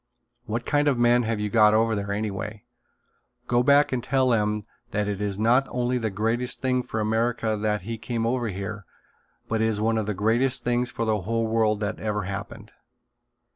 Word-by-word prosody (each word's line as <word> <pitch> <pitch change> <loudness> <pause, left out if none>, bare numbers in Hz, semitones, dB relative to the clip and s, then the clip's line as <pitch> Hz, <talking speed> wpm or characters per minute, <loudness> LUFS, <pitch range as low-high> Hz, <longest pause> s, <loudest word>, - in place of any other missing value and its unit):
What 115 +2 -3
kind 145 0 +2
of 140 -4 +3
men 120 0 +4
have 115 -2 -1
you 105 -1 -2
got 110 -2 +5
over 115 0 +3
there, 100 -1 -3
anyway? 105 0 -4 0.8
Go 120 0 +2
back 140 +3 +4
and 125 -2 -1
tell 130 0 +2
them 105 -2 +1 0.2
that 105 -3 -1
it 100 -1 -3
is 100 -2 -2
not 120 +5 +3
only 125 0 -1
the 110 -2 -1
greatest 115 +5 -1
thing 130 -1 +1
for 110 - -4
America 110 +1 0
that 105 -1 -1
he 115 +4 -5
came 115 0 -2
over 120 0 0
here 100 0 -5 0.6
but 110 -1 -1
it 110 - +3
is 110 -2 -1
one 110 +1 +1
of 105 - -3
the 105 - -1
greatest 120 +6 +1
things 120 0 +1
for 115 - -3
the 110 -2 0
whole 115 +4 -1
world 110 -1 +1
that 105 +1 -2
ever 105 -2 -2
happened." 100 +1 -7
110 Hz, 200 wpm, -25 LUFS, 105-120 Hz, 0.8 s, got